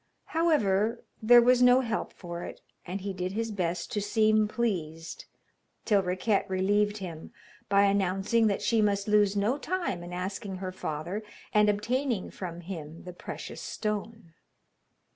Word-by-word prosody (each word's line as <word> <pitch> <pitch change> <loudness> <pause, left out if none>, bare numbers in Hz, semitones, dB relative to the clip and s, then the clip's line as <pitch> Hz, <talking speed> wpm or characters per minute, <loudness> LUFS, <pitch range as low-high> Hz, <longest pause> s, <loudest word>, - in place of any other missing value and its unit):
However, 230 - +2 0.2
there 240 +2 +7
was 250 +1 +4
no 250 +1 +6
help 230 -3 -2
for 175 -2 -7
it, - - -8 0.3
and 190 +3 -4
he 195 0 -3
did 185 0 -3
his 225 +1 -2
best 175 -3 -2
to 210 - -1
seem 215 +1 +3
pleased, 170 -9 -3 0.6
till 205 -3 +4
Riquette 185 +3 0
relieved 205 +2 +1
him 170 -5 -7 0.4
by 200 0 +5
announcing 200 +3 +2
that 205 0 -1
she 220 +1 +3
must 200 -1 +1
lose 210 -1 +3
no 215 +8 +1
time 345 - -2
in 175 0 -8
asking 190 +2 -4
her 185 0 -5
father 175 +3 -4 0.3
and 210 0 +5
obtaining 235 +2 -1
from 175 -2 -6
him 165 -3 -8
the 180 - -8
precious - - -7
stone. 210 -4 -4
200 Hz, 150 wpm, -28 LUFS, 185-220 Hz, 0.6 s, there